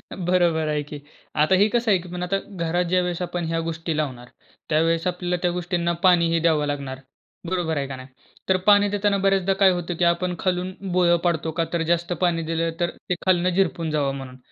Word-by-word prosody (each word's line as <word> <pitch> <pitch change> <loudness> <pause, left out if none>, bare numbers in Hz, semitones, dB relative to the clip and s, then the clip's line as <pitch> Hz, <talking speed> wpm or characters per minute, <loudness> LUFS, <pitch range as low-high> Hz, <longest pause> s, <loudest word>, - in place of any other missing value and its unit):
बरोबर 175 -3 +1
आहे 150 -1 0
की. 145 0 -9 0.4
आता 155 +5 +3
हे 205 +3 +4
कसं 235 -2 +2
आहे 190 - +4
की 180 - -11
आता 195 +2 0 0.3
घरात 175 +2 +1
ज्यावेळेस 180 -1 0
आपण 175 -1 -3
ह्या 165 0 -1
गोष्टी 165 0 -3
लावणार 125 -5 -3 0.4
त्यावेळेस 165 +2 +1
आपल्याला 180 0 -1
त्या 175 -1 +1
गोष्टींना 175 -1 -1
पाणी 175 -2 +5
ही 165 - +2
द्यावं 155 -3 +2
लागणार. 140 -2 -4 0.5
बरोबर 170 -4 -1
आहे 140 -1 -2
का 135 - -6
नाही? 130 0 -10 0.4
तर 190 - +4
पाणी 205 0 +6
देताना 205 0 +1
बऱ्याचदा 195 -1 +2
काय 190 -1 +6
होतं 175 -1 -3
की - - +2
आपण 175 +1 +1
खालून 185 0 -1 0.2
भोळ 175 -1 +4
पाडतो, 165 -2 0
का 165 +1 -1
तर 170 - 0
जास्त 170 +1 0
पाणी 170 -2 +2
दिलं 165 0 0
तर 175 - +1 0.2
ते 180 - +1
खालनं 180 -1 +3
झिरपून 170 -3 0
जावं 140 -2 0
म्हणून. 130 -1 -8
175 Hz, 205 wpm, -23 LUFS, 160-180 Hz, 0.5 s, पाणी